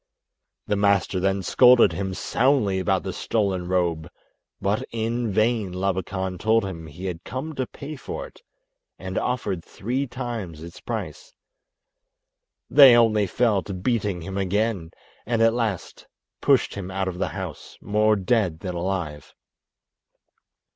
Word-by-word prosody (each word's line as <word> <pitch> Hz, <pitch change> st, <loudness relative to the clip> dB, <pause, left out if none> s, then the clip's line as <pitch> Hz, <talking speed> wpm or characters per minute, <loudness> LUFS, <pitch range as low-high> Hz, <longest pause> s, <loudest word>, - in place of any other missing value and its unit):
The 105 Hz, -, 0 dB
master 100 Hz, -2 st, +2 dB
then 95 Hz, +1 st, 0 dB
scolded 125 Hz, 0 st, +6 dB
him 95 Hz, +2 st, -3 dB
soundly 115 Hz, -7 st, +1 dB
about 95 Hz, -, +1 dB
the -, -, -4 dB
stolen 95 Hz, -5 st, -1 dB
robe, 85 Hz, -3 st, 0 dB, 0.5 s
but 100 Hz, +2 st, 0 dB
in 115 Hz, 0 st, -1 dB
vain 110 Hz, -1 st, +1 dB
Labakan 95 Hz, 0 st, -2 dB
told 110 Hz, -1 st, +2 dB
him 85 Hz, -4 st, -6 dB
he 80 Hz, +5 st, -9 dB
had 90 Hz, -2 st, -4 dB
come 135 Hz, +6 st, -5 dB
to 130 Hz, -3 st, -3 dB
pay 150 Hz, +2 st, -8 dB
for 135 Hz, -, -6 dB
it -, -, -16 dB, 0.6 s
and -, -, -6 dB
offered 115 Hz, -9 st, -2 dB
three 130 Hz, +7 st, -3 dB
times 115 Hz, -, -5 dB
its 85 Hz, +1 st, -11 dB
price. -, -, -6 dB, 1.3 s
They 135 Hz, -4 st, +8 dB
only 110 Hz, -3 st, +4 dB
fell 110 Hz, -1 st, +2 dB
to 95 Hz, +1 st, -6 dB
beating 100 Hz, -2 st, -1 dB
him 95 Hz, +2 st, -4 dB
again, 100 Hz, -2 st, 0 dB, 0.4 s
and 115 Hz, -1 st, +1 dB
at 115 Hz, 0 st, +4 dB
last 110 Hz, -6 st, -3 dB, 0.3 s
pushed -, -, +3 dB
him 95 Hz, -2 st, -6 dB
out 95 Hz, 0 st, -2 dB
of 90 Hz, -1 st, -4 dB
the -, -, 0 dB
house -, -, -7 dB
more 105 Hz, +1 st, +2 dB
dead 95 Hz, -4 st, 0 dB
than 90 Hz, -2 st, -4 dB
alive. 85 Hz, -5 st, -4 dB
100 Hz, 140 wpm, -24 LUFS, 90-115 Hz, 1.3 s, They